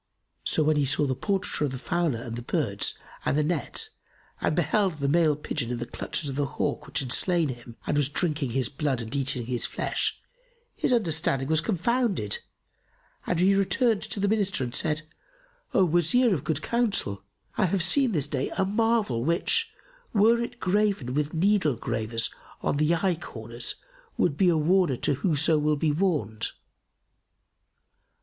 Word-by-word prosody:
So 155 - +1
when 155 0 +2
he 145 - +2
saw 145 +2 +1
the 135 - 0
portraiture 190 - -1
of 140 - -2
the - - -4
fowler 145 -4 -1
and 115 -1 -5
the 120 - -5
birds 120 - -1 0.3
and - - +1
the 150 - +3
net 155 -1 -1 0.5
and 155 - +1
beheld 175 +4 +2
the 140 -2 -2
male 155 0 +3
pigeon 125 -5 -3
in 125 - -2
the 120 - -4
clutches 150 - -4
of 135 -1 -4
the 145 -1 +1
hawk, - - -1
which 140 +1 -1
had 130 -3 -4
slain 175 -5 +3
him 120 -2 -8
and - - 0
was 145 -2 +2
drinking 155 -3 -1
his 125 0 0
blood 140 -2 -1
and 115 +5 -6
eating 135 -3 0
his 120 -1 -1
flesh, - - -1 0.6
his - - 0
understanding 160 - +1
was 160 0 +3
confounded 210 - 0 0.9
and 175 - 0
he 190 +2 +5
returned 200 +3 +2
to - - -4
the 200 - +1
Minister 200 -7 0
and 120 -1 -4
said, 155 +3 +1 0.7
"O 190 - +4
Wazir 175 +8 +3
of 150 - -2
good 160 -4 -2
counsel, 205 - 0 0.3
I 210 - +2
have 185 0 +1
seen 260 +7 +3
this 150 -8 +2
day 135 -2 -2
a 190 - +2
marvel 210 - +1
which, 170 - +2 0.4
were 225 +3 +5
it 235 0 -5
graven 195 - +1
with 150 +2 -1
needle 185 -5 +2
gravers 115 0 -1 0.3
on - - 0
the 155 +3 +3
eye 175 -1 0
corners 115 +2 -6 0.4
would 140 - +2
be 180 +3 +4
a 165 - +3
warner 170 -3 +3
to 145 - +1
whoso 155 +1 +2
will 150 0 +2
be 150 +1 +1
warned." 145 - 0
155 Hz, 175 wpm, -27 LUFS, 135-190 Hz, 0.9 s, he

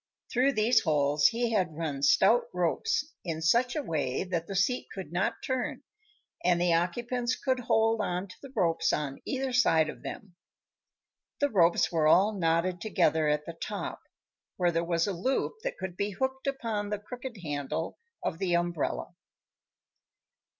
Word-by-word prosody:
Through 260 +3 +3
these 225 +2 +4
holes 145 -2 +3
he 235 +4 0
had 180 -8 0
run 150 -4 -3
stout 475 - +5
ropes 440 -9 0 0.2
in 165 -3 -3
such 235 +10 +2
a 305 - -1
way 145 - -1
that 170 -3 -3
the 195 - -5
seat 225 +7 +1
could 190 -5 -7
not 180 +3 -1
turn 260 +2 -2 0.6
and 175 -1 +3
the 175 -1 +3
occupants 240 +8 0
could 260 -1 0
hold 225 -2 +2
on 180 -1 -2
to 185 - -12
the 275 - -10
ropes 165 -2 +2
on 140 -2 -3
either 265 -1 -2
side 160 -11 +4
of - - -8
them. 200 -6 -8 1.0
The 285 0 +1
ropes 175 -5 +3
were 160 -3 +2
all 195 +7 +5
knotted 175 -1 0
together 160 -6 +2
at 150 0 +1
the 170 - -6
top, 205 +4 -5 0.6
where 175 -1 +2
there 165 0 0
was 170 -1 +1
a 200 - -1
loop 260 - -1
that - - -3
could 190 -2 -5
be 200 +2 -1
hooked 265 +6 -3
upon 225 -7 -2
the 210 - -1
crooked 245 +3 -8
handle 150 +1 -3 0.2
of 165 - -2
the 180 -3 +1
umbrella. 170 -2 -1
185 Hz, 165 wpm, -29 LUFS, 165-240 Hz, 1.0 s, stout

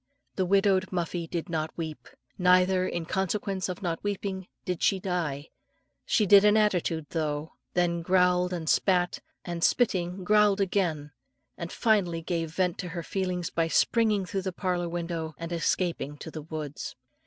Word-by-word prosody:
The 185 - 0
widowed 195 -1 +3
Muffie 175 -1 -2
did 170 -2 -3
not 160 -2 -3
weep, 160 -2 -5 0.3
neither, 185 0 +4
in 170 -1 -3
consequence 190 +1 -1
of 180 +1 -5
not 165 -2 -2
weeping, 195 -2 -3 0.2
did 180 -2 -2
she 195 - +3
die; 165 -6 -3 0.6
she 215 - +3
did 200 +1 +7
an 210 +1 +5
attitude 180 -7 +1
though, 155 -1 -2 0.2
then 170 -1 +1
growled 180 0 +3
and 170 -3 -4
spat, 180 +1 +2 0.3
and 170 -1 -4
spitting 185 -6 +1
growled 210 +1 +4
again, 175 -7 0 0.4
and 170 0 -6
finally 185 -8 +1
gave 165 -1 -2
vent 180 +1 0
to 180 - -4
her 170 0 -5
feelings 180 -1 -2
by 165 -1 +1
springing 215 +2 +2
through 195 +2 -3
the 190 0 -3
parlour 180 -2 -1
window 165 -2 -4
and 165 0 -6
escaping 165 -4 -1
to 160 - -8
the 155 - -6
woods. 150 -2 -6
180 Hz, 160 wpm, -28 LUFS, 165-190 Hz, 0.6 s, did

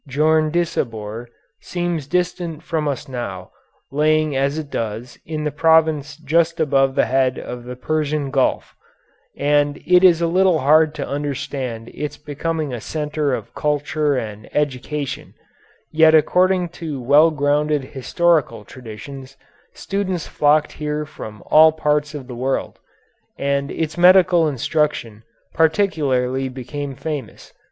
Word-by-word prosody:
Djondisabour 150 -7 0 0.3
seems 175 -5 -3
distant 175 -1 -2
from 160 -3 -2
us 140 -2 -3
now, 115 -8 -6 0.4
lying 155 0 +2
as 140 +2 0
it 150 -3 -6
does 115 +2 -5
in 155 -1 -3
the 150 - -1
province 155 -1 +2
just 165 +2 +1
above 135 -3 +2
the - - +3
head 130 +1 +1
of 120 -1 -7
the 125 0 -7
Persian 150 +1 -2
Gulf, 135 -2 0 0.6
and 145 +1 +1
it 180 +1 +5
is 175 -3 +6
a 170 - +1
little 180 0 +3
hard 155 +2 +4
to 140 - -4
understand 140 -5 -4
its 150 -1 -5
becoming 150 0 -3
a 120 - -5
centre 150 -2 -2
of - - -9
culture 150 0 0
and 105 -3 -6
education, 145 0 -3 0.6
yet 160 0 +5
according 180 +3 +3
to 160 -5 -6
well 145 +6 +5
grounded 150 -1 0
historical 135 - 0
traditions 130 +4 -10 0.4
students 190 -4 -3
flocked 150 +1 +2
here 150 0 -3
from 110 -8 -10
all 155 +1 +6
parts 150 -1 -1
of 140 -3 -7
the 125 - -9
world, 130 +3 -3 0.6
and 140 0 -1
its 160 +1 -3
medical 180 -2 +6
instruction 140 -5 -1 0.3
particularly 140 -7 +1
became 135 +2 -6
famous. 145 -5 -6
150 Hz, 130 wpm, -20 LUFS, 135-160 Hz, 0.6 s, is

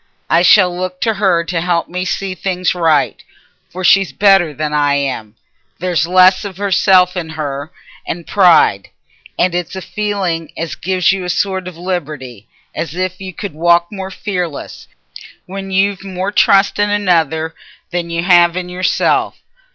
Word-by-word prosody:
I 165 - +4
shall 180 0 +5
look 180 0 -4
t' 225 - +1
her 190 -5 +1
to 170 0 -3
help 170 -1 0
me 180 +1 -4
to - - -2
see 195 -1 -3
things 185 -1 -1
right. 165 -4 +1 0.5
For 185 +2 -7
she's 195 +1 +4
better 195 -5 +3
than 150 +1 -4
I 145 -1 +2
am—there's 140 - -4
less 185 +2 +5
o' 200 0 -4
self 185 -1 +4
in 170 -3 -4
her, 150 -1 -5 0.4
and 170 0 -5
pride. 175 - +3 0.5
And 180 0 +1
it's 175 +1 -3
a - - -4
feeling 195 -6 -3
as 165 0 -4
gives 185 -1 +1
you 190 -1 -2
a 180 - -4
sort 190 0 -1
o' - - -5
liberty, 145 - -5 0.3
as 165 -1 -5
if 185 +1 -3
you 190 -1 -6
could 190 -1 -7
walk 170 +2 +2
more 190 -2 -6
fearless, 180 -6 -5 0.6
when 195 +1 -7
you've 195 +1 0
more 190 0 -4
trust 195 -1 +3
in 205 0 +2
another 165 -6 0 0.4
than 175 -1 -3
y' 170 0 -2
have 175 -1 +4
in 180 -1 -4
yourself. 180 +1 0
180 Hz, 165 wpm, -16 LUFS, 165-190 Hz, 0.6 s, shall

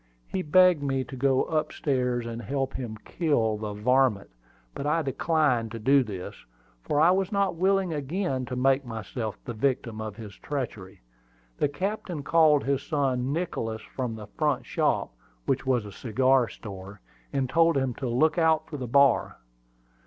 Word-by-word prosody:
He 190 - -2
begged 180 -1 +5
me 135 -2 0
to 130 - -9
go 130 0 +2
up 155 -2 -1
stairs, 125 -4 -1
and 115 0 -5
help 135 +4 -2
him 115 -4 -5
kill 115 -11 0
the 105 -1 -5
"varmint;" 120 - +2 0.4
but 140 - -4
I 160 +2 +1
declined 135 -4 +1
to - - -4
do 135 +5 +4
this, 95 -6 -6 0.5
for 145 - 0
I 165 +3 +6
was 190 +1 0
not 200 -2 +1
willing 190 0 +1
again 145 -2 -2
to 125 - -4
make 135 +2 +2
myself 115 -1 -5
the 120 - -4
victim 115 -2 -1
of 110 -2 -5
his 105 -3 -9
treachery. 105 -8 -6 0.6
The 145 - +2
captain 180 -1 -4
called 155 -2 +4
his 140 0 0
son 135 -4 -1
Nicholas 140 -9 -3
from 125 -4 -2
the 110 -1 -8
front - - -1
shop, - - 0 0.3
which - - -1
was 125 -5 +2
a 105 - -8
cigar 130 +4 +2
store, 100 0 -9 0.3
and 135 -1 0
told 165 +3 +3
him 130 -2 0
to 135 - -3
look 155 +8 +2
out 160 -1 +3
for 150 - -4
the 125 -2 -5
bar. 140 +1 +3
135 Hz, 170 wpm, -27 LUFS, 115-155 Hz, 0.6 s, I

